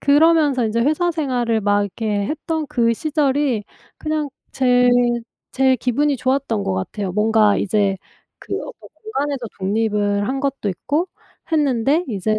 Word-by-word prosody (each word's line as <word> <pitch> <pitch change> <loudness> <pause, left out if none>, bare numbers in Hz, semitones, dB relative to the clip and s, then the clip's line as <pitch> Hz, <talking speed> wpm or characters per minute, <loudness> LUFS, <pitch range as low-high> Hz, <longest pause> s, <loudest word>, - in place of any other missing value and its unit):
그러면서 290 -3 +4
인제 225 +1 0
회사 310 +7 +2
생활을 250 -8 0
막 205 0 +2
이렇게 205 0 -2
했던 315 +2 -3
그 230 -2 +2
시절이 285 -4 0 0.3
그냥 310 -1 -2 0.2
제 250 -1 +3 0.7
제 260 -1 +3
기분이 280 +4 +1
좋았던 255 -4 0
것 - - -1
같아요. 180 - -3
뭔가 210 +1 +3
이제 200 -1 +1 0.4
그 - - -6
어떤 - - -10
공간에서 285 - -3
독립을 205 0 0
한 270 +3 -2
것도 275 -7 -1
있고 290 - -2 0.4
했는데 285 +1 +2
이제 215 0 -1
250 Hz, 285 characters per minute, -20 LUFS, 210-290 Hz, 0.7 s, 그러면서